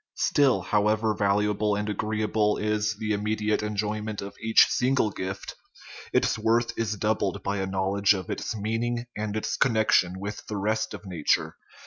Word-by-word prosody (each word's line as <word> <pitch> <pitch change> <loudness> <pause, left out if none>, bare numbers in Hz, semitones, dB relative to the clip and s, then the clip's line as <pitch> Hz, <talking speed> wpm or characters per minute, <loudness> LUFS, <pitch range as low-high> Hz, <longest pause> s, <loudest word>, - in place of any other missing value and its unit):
Still, 130 -9 +3
however 105 +2 +1
valuable 105 +1 +1
and 105 +1 -2
agreeable 105 0 0
is 105 0 0
the 110 0 -2
immediate 105 +1 0
enjoyment 105 0 -3
of 100 0 -6
each 110 0 +6
single 125 -4 +1
gift, 95 0 -5 0.6
its - - +1
worth 115 +2 +1
is 110 -2 -1
doubled 105 -2 -1
by 100 +1 -1
a 95 -1 -2
knowledge 95 +2 +2
of 95 -3 -5
its - - -4
meaning 115 +3 -2
and 105 0 -3
its 110 - -2
connection 110 -6 +2
with 105 +2 -6
the 105 - -4
rest 110 +2 -1
of - - -11
nature. 85 -5 0
105 Hz, 155 wpm, -26 LUFS, 100-110 Hz, 0.6 s, each